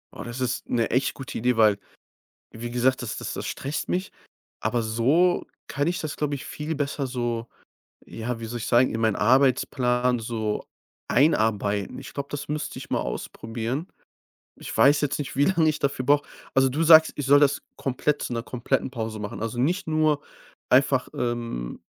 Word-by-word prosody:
Oh, - - -6
das 120 +2 -6
ist 125 -1 -2
'ne 115 -2 +1
echt 130 +2 +1
gute 135 - -6
Idee, 125 +1 +1
weil 105 -3 +5 0.7
wie 120 +1 -6
gesagt, 125 +2 +2
das 120 - -4
das - - -5
das - - -5
stresst 140 +3 -4
mich, 185 +1 -2 0.5
aber 120 -1 0
so 135 +11 +2 0.2
kann 145 +2 -1
ich 175 +1 0
das, 155 -2 -4
glaube 145 -1 -1
ich, 140 +1 -6
viel 155 +2 -4
besser 140 -1 -2
so, 120 -2 -3 0.6
ja, 115 +1 -5
wie - - -4
soll 120 +2 -5
ich 110 - -4
sagen, 120 +1 +3
in 115 - -2
meinen 110 -3 +2
Arbeitsplan 125 0 +2
so 110 -2 -3 0.4
einarbeiten. 110 - +2
Ich - - -9
glaube, 140 0 -4
das 145 0 -5
müsste 150 0 -3
ich - - -9
mal - - 0
ausprobieren. 115 - -4 0.7
Ich - - -7
weiß 145 +1 +5
jetzt 145 -2 -1
nicht, 140 -3 -5
wie 140 - +4
lang 170 -4 +3
ich 155 -1 +1
dafür 140 -2 -1
brauche. 145 0 +3 0.3
Also, 135 0 +5
du 145 +5 -1
sagst, 160 -1 +8
ich 145 - -3
soll 145 +1 +6
das 145 -1 +3
komplett 140 +3 -1
zu - - -4
'ner 115 -1 -3
kompletten 130 +2 -1
Pause 110 -3 -4
machen. 105 0 -6
Also, 115 +1 -3
nicht 175 +8 0
nur 155 -2 +2 0.5
einfach, 130 0 +4
ähm, 120 - -3
130 Hz, 185 wpm, -25 LUFS, 115-145 Hz, 0.7 s, sagst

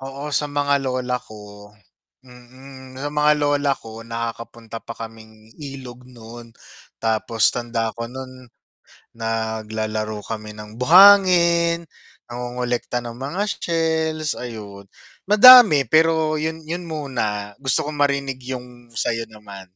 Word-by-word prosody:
oo, 140 +2 -7
sa 145 0 0
mga 145 -1 0
lola 125 -1 -2
ko 105 -2 -13 0.6
mm, 130 +1 -14
sa - - -1
mga 150 0 +3
lola 145 -1 +1
ko, 110 0 -11
nakakapunta 115 0 -7
pa 115 - -9
kaming 110 -1 -12
ilog 130 -3 -9
nun, 115 -1 -12 0.5
tapos 110 0 +1
tanda 115 -2 -3
ko 115 0 -5
nun, 130 0 -10 0.7
naglalaro 110 -1 -3
kami 110 -1 -6
ng 105 +2 -11
buhangin, 170 -1 +6 0.4
nangongolekta 125 0 -3
ng 115 - -7
mga 145 +10 -3
shells 160 -2 -1
ayun, 105 -5 -9 0.4
madami 210 - +9
pero 160 +3 +2
yun 160 +1 -3
yun 175 +3 -4
muna 120 -10 -4
gusto 135 +1 +1
kong 150 - -5
marinig 140 -2 0
yung 125 -2 -9
sayo 115 0 -2
naman. 105 -3 -12
125 Hz, 120 wpm, -21 LUFS, 115-145 Hz, 0.7 s, madami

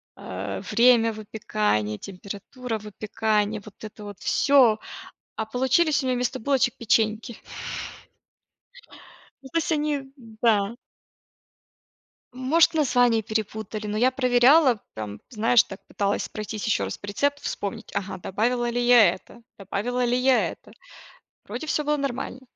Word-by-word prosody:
э, 95 +1 -6
время 230 0 +5
выпекания, 210 - -1
температура 205 +5 -6
выпекания, 210 0 -1
вот 210 +1 -15
это 210 0 -9
вот 205 -2 -9
всё. 255 -6 +4 0.6
А 220 - -3
получились 265 +6 +2
у - - -3
меня 255 - +1
вместо 250 +1 -2
булочек 265 0 +1
печеньки. 220 -1 +2 2.2
Ну 265 - -11
то 335 - 0
есть 330 - 0
они 295 -3 -1 0.3
Да. 220 -1 +2 1.6
Может 280 +7 +3
название 245 -6 +3
перепутали, 215 0 -4
но 210 +1 -2
я 255 +3 +3
проверяла, 255 0 +4
прям, 105 -1 -7
знаешь 230 +1 +4
так, 195 - -10
пыталась 200 0 -1
пройтись 215 0 -6
ещё 220 - +1
раз - - -4
по - - -10
рецепту, 285 +8 0
вспомнить: 220 +2 -4
ага, 195 -1 -3
добавила 240 +6 -1
ли 245 +1 -1
я 230 -8 +7
это, 235 +5 -16 0.2
добавила 215 +6 -2
ли 245 +1 +2
я 255 0 +3
это? - - -12 0.7
Вроде 315 - -6
всё 300 - 0
было 300 0 +1
нормально. 260 -1 -4
230 Hz, 135 wpm, -25 LUFS, 210-255 Hz, 2.2 s, я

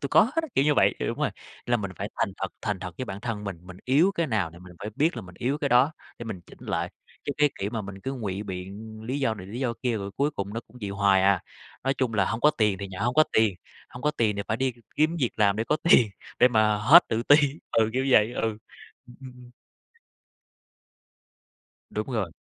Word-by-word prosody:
tui 140 - -3
có - - +6
hết 240 +6 -1
á", 320 - -5
kiểu 135 - +3
như 150 -1 +3
vậy. - - +4
Đúng - - -3
rồi, - - +1 0.4
là 120 0 +3
mình 100 -3 -4
phải 100 - -4
thành 105 -4 0
thật 95 - -3
thành 105 -4 -2
thật 90 -3 -6
với 130 - -2
bản 100 -2 -7
thân 115 -3 -4
mình, 95 -4 -5
mình 90 0 -11
yếu 155 +10 +4
cái 170 -1 0
nào 105 -9 0
thì 85 - -13
mình 90 0 -13
phải 105 - -5
biết 155 -2 +2
là 115 - -5
mình 90 -1 -13
yếu 135 +4 -1
cái 145 -3 -1
đó 130 +5 +4 0.3
để 120 - -6
mình 105 -6 -6
chỉnh - - -17
lại, - - -2 0.3
chứ 145 - -2
cái 150 -1 +4
kiểu 100 +2 -2
mà 110 -3 -3
mình 95 0 -8
cứ 135 +6 -4
ngụy 105 -6 -4
biện 100 +3 -7
lý 130 +5 -3
do 115 -5 +1
này, 95 -3 -9
lý 115 +6 -6
do 125 -3 0
kia 120 -3 +1
rồi 100 -1 -5
cuối 145 +2 +2
cùng 100 -5 -5
nó 115 - -2
cũng 125 - -18
vậy 100 -2 -4
hoài 100 -1 +3
à. 95 -2 +4 0.4
Nói 135 - +2
chung 130 -4 -1
là 100 -3 +3
hông 115 - -2
có 150 - +6
tiền 105 -8 +1
thì 100 0 -5
nhận 95 +1 -6
hông 120 +1 +1
có 155 0 +6
tiền, 110 -4 +3 0.3
hông 125 - -11
có 150 - +2
tiền 110 -7 0
thì 100 - -2
phải 110 - 0
đi 130 0 0 0.2
kiếm 155 +3 +2
việc 125 - +2
làm 100 -2 +3
để 110 - -1
có 150 - +1
tiền, 115 - +7 0.3
để 125 - +7
mà 110 -3 +3
hết 145 +12 +7
tự 110 +1 0
ti 145 +4 +7 0.4
ừ, 110 -1 +3
kiểu 130 +2 0
vậy, 110 0 +5
ừ, - - -3 0.7
ừm, 120 - -15
ừm, 130 -1 -10
ừm. 125 -1 -15 2.4
Đúng - - -3
rồi. - - -1
110 Hz, 255 wpm, -26 LUFS, 100-130 Hz, 2.4 s, tiền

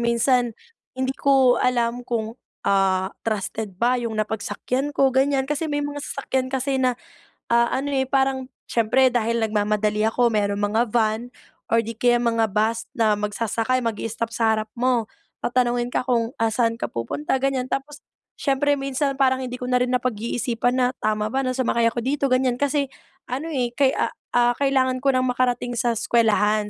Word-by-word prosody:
minsan 235 0 +2 0.4
hindi 260 0 -1
ko 270 -3 +3
alam 245 -1 +1
kung, 225 -2 -2 0.3
ah, 190 -1 +2
trusted 215 -2 -3
ba 245 +3 +2
yung 230 -2 -3
napagsakyan 220 +6 -2
ko 270 -2 +4
ganyan. 270 0 +2
Kasi 295 +3 -2
may 290 0 -1
mga 290 0 -4
sasakyan 265 -2 -2
kasi 265 0 -1
na, 250 -2 +1 0.6
ah, 235 0 +4
ano, 280 +2 -2
eh, 265 -1 0
parang 265 -1 +1 0.2
siyempre 245 +3 +2
dahil 230 -1 0
nagmamadali 210 0 +1
ako 235 +1 +2
merong 205 -1 0
mga 225 +2 +2
van 220 0 +1 0.5
or 230 0 +2
di 230 - -5
kaya 240 -1 +4
mga 230 -2 +1
bus 220 +3 0
na 220 -2 +3
magsasakay 225 +4 -1
magi-stop 230 +1 -3
sa 225 -1 +2
harap 215 0 -4
mo. 250 -2 +2 0.4
Tatanungin 245 0 +1
ka 250 - -1
kung, 235 -2 +1
ah, 225 - +3
saan 230 0 0
ka - - -2
pupunta 130 - -2
ganyan 260 -2 0
tapos 295 +3 -4 0.4
siyempre 285 0 +1
minsan 275 0 -1
parang 260 -1 +2
hindi 250 0 -5
ko 250 - -4
na 250 - +1
rin 250 - -2
napag-iisipan 245 0 -1
na 250 - +4 0.2
tama 215 0 +1
ba 265 +4 -1
na 255 - 0
sumakay 235 -2 +1
ako 240 - -3
dito 280 +1 0
ganyan. 255 -1 +2
Kasi 285 +1 0 0.4
ano, 280 +7 -4
eh, 245 -4 -1
kay 275 -2 +3 0.4
ah, 240 0 +3
kailangan 260 -2 +2
ko 275 - +2
ng 255 -1 +2
makarating 245 -1 0
sa 235 -1 0
eskuwelahan. 215 -2 +2
245 Hz, 170 wpm, -23 LUFS, 225-265 Hz, 0.6 s, ko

